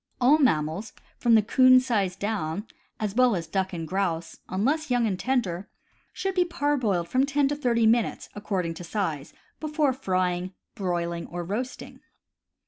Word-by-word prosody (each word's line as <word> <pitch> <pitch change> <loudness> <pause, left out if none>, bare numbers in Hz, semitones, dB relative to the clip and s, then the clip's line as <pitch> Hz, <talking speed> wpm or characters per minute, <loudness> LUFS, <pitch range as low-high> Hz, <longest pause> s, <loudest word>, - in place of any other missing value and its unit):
All 275 +5 +5
mammals 165 - +1 0.3
from 235 -2 +4
the 220 - +5
'coon 255 +4 +6
size 205 -8 0
down, 200 -2 -3 0.3
as 210 -3 -2
well 250 -1 +4
as 170 -2 -3
duck 190 +3 -1
and 165 -3 -5
grouse, 175 -2 -2
unless 280 +11 0
young 245 -2 +2
and 190 -4 -1
tender, 205 -8 -1 0.4
should 385 0 -3
be 365 -1 +3
parboiled 285 - 0
from 255 +8 +2
ten 280 0 +2
to 290 - -1
thirty 240 -5 +1
minutes, 230 +1 +2
according 190 -5 -2
to 165 - -9
size, 165 -6 -3 0.3
before 300 -3 +1
frying, 185 -6 -1 0.2
broiling, 170 -3 -2
or 175 0 -5
roasting. 225 +9 -5
210 Hz, 155 wpm, -26 LUFS, 180-255 Hz, 0.4 s, coon